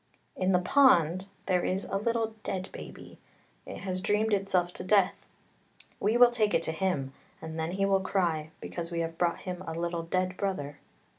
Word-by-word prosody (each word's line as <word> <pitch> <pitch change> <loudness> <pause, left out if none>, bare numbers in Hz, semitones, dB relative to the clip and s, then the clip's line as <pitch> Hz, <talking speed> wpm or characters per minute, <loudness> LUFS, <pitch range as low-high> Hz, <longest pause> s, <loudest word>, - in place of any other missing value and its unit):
" - - -40
" - - -42
In 190 - +3
the 180 - +5
pond 185 - +4 0.2
there 180 -2 +1
is 190 +2 -1
a - - -4
little 225 +1 0
dead 190 -2 -3
baby, - - -10 0.5
it - - -7
has 185 -1 -3
dreamed 210 +2 +1
itself 185 -3 +1
to - - -7
death, 195 0 +4 0.9
we 220 +3 +2
will 245 0 +7
take 215 -3 +1
it - - +2
to - - -2
him, 160 -6 -1 0.3
and 160 0 -6
then 160 +2 -2
he 195 +1 +1
will 195 -1 +3
cry, 170 -5 0
because 170 -1 -5
we 170 -1 -2
have 165 0 -4
brought 175 -1 +1
him 180 -1 -5
a 160 - -4
little 170 0 -2
dead 185 +2 -1
brother. 145 -8 -3
185 Hz, 200 wpm, -29 LUFS, 170-195 Hz, 0.9 s, will